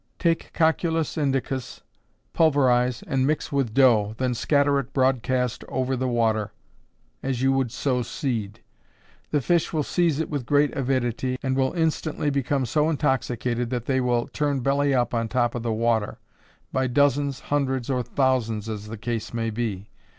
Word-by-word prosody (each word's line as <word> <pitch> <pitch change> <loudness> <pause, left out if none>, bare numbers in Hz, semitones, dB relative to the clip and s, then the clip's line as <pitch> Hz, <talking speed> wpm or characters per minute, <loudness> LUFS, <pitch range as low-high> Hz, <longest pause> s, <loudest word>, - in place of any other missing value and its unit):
_ - - -44
Take 165 -1 0
Cocculus 160 0 +1
Indicus, 135 -3 -2 0.5
pulverize 125 -6 +3
and 135 0 +1
mix 155 +1 -1
with 135 -5 0
dough, 110 -4 +4
then 130 -1 0
scatter 140 +3 +2
it 135 0 -6
broadcast 130 -2 +1
over 130 0 -1
the 130 +1 -1
water, 110 -3 +1 0.7
as 130 -2 -2
you 135 - +4
would 135 -3 0
sow 125 -1 0
seed. 115 -6 -3 0.7
The 150 - +1
fish 170 +4 +1
will 155 -2 0
seize 165 -2 +1
it 160 - -1
with 140 -5 -4
great 145 0 +3
avidity, 130 -1 -1
and 130 -1 0
will 130 0 +1
instantly 160 -3 0
become 140 -1 0
so 150 +6 +1
intoxicated 125 -5 -1
that 120 -2 -3
they 130 -1 +1
will 120 -1 +1
turn 145 -3 -1
belly 140 +2 +2
up 125 -3 +1
on 115 -1 0
top 120 0 0
of 120 - -3
the 115 0 -2
water, 110 -1 0 0.6
by 130 -1 +1
dozens, 140 +1 +2
hundreds, 135 -4 0
or 130 -2 0
thousands, 120 -4 0
as 105 -1 -5
the 110 +1 -7
case 115 0 -4
may 115 -1 -1
be. 105 -3 -4
130 Hz, 165 wpm, -24 LUFS, 120-140 Hz, 0.7 s, dough